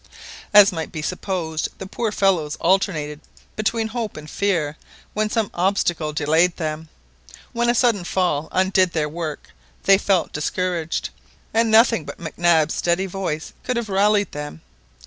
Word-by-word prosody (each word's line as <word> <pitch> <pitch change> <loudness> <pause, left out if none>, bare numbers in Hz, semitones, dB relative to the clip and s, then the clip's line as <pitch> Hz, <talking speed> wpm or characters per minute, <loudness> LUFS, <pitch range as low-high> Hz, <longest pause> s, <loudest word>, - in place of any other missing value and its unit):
As 205 0 +8
might 165 -3 -5
be 155 - -5
supposed 170 -3 -2
the 190 - -7
poor 220 +3 -2
fellows 180 -8 +1
alternated 165 -5 0 0.4
between 220 +1 -1
hope 225 -5 -4
and 155 0 -9
fear 170 -6 -1 0.4
when 215 0 0
some 220 -2 -1
obstacle 175 -4 0
delayed 160 +3 +2
them. 155 -1 -4 0.6
When 235 0 +1
a 240 - +3
sudden 230 -6 +2
fall 175 -4 0
undid 185 -1 +2
their 155 -2 0
work 155 -1 -6 0.3
they 195 0 +5
felt 190 -5 +1
discouraged, 170 +1 -2 0.4
and 230 0 +3
nothing 225 -4 +5
but - - -9
Mac 160 -2 -7
Nab's 165 -3 +3
steady 175 +2 0
voice 180 -5 -4
could 250 -2 -1
have 235 -3 -3
rallied 205 0 +2
them. 145 - -7
180 Hz, 150 wpm, -22 LUFS, 160-205 Hz, 0.6 s, As